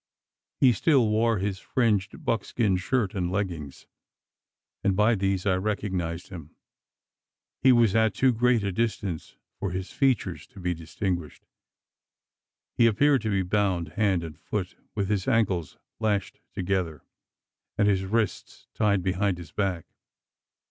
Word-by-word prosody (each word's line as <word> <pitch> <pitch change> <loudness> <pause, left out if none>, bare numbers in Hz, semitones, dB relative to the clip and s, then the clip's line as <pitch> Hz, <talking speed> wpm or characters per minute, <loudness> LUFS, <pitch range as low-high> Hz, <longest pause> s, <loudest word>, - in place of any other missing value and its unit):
He 130 - +6
still 130 -5 +3
wore 115 +1 +2
his 95 0 -2
fringed 105 -5 0
buckskin 110 -2 +1
shirt 105 +2 0
and 90 -3 -2
leggings; 85 -8 -4 1.0
and 100 -2 +2
by 105 +4 +4
these 95 -2 0
I 100 - +3
recognised 95 -4 -2
him. 80 -5 -10 1.1
He 130 - +6
was 115 -5 +4
at 110 -3 +3
too 130 +2 +3
great 120 -1 +2
a 100 - -1
distance 100 -5 -3 0.2
for 100 - -2
his 95 +1 -4
features 135 -4 0
to 100 - -14
be 90 -1 -1
distinguished. 85 0 -4 1.3
He 115 - +5
appeared 135 +5 +3
to 110 - -2
be 95 -2 +1
bound 90 -4 0
hand 95 0 +1
and 80 -1 -8
foot 95 -2 -4 0.2
with 100 -2 0
his 100 -2 -1
ankles 100 - +1 0.2
lashed 105 -3 -1
together, 90 -5 -2 0.7
and 100 - +3
his 95 -2 +2
wrists 110 +1 -2
tied 100 -3 +1
behind 95 0 0
his 85 - -10
back. 95 -5 -1
100 Hz, 140 wpm, -26 LUFS, 90-110 Hz, 1.3 s, He